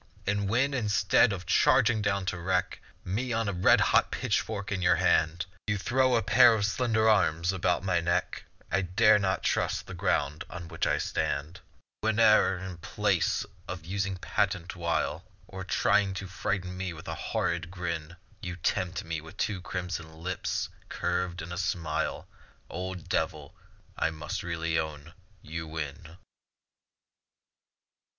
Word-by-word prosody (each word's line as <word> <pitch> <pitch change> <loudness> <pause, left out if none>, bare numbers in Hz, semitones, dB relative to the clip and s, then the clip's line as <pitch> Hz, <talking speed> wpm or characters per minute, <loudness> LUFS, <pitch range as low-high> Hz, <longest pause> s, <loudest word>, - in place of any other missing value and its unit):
And 100 0 0
when, 135 +6 +2
instead 110 -1 +3
of 90 -3 -5
charging 115 +4 +4
down 100 -2 0
to 90 -1 -2
wreck 90 +1 -1 0.2
Me 115 +8 -2
on 115 -1 0
a 100 - -1
red 90 +1 +5
hot - - +4
pitchfork 100 -2 -2
in 95 -2 -1
your 90 0 +4
hand, 80 0 +2 0.2
You 105 0 +1
throw 130 +5 +2
a 115 - +2
pair 120 +2 +7
of 100 -2 +1
slender 110 0 +1
arms 85 -5 +3
about 90 -1 +1
my 90 -3 +2
neck, 85 +1 -1 0.3
I 95 - +2
dare 100 +4 +4
not 95 -1 0
trust - - 0
the - - -8
ground 75 +2 0
on 85 -1 -7
which 80 -2 -1
I - - +2
stand. 75 +6 -2 0.4
Whene'er 110 -3 +4
in 95 -1 -7
place - - 0 0.2
of 90 -3 -6
using 95 +1 -2
patent 95 -1 -1
wile, 85 0 -1 0.2
Or 95 0 -7
trying 100 0 +2
to 95 - -4
frighten 90 -1 -3
me 95 -1 -3
with 80 0 -11
horrid - - -2
grin, 85 -3 -4 0.3
You 90 -1 -4
tempt 90 +1 -1
me 80 -2 -4
with 80 +5 -13
two 100 -4 -1
crimson 90 -3 -4
lips 90 +3 -2 0.2
curved 90 -1 -2
in 85 - -8
a 90 - -4
smile; 80 -5 -2 0.4
Old 90 -1 -5
Devil, - - -2 0.5
I - - +2
must 80 -1 -5
really 85 -1 -1
own, 80 0 -5 0.3
you 80 +1 -5
win. 80 +1 -6
90 Hz, 150 wpm, -29 LUFS, 85-100 Hz, 0.5 s, pair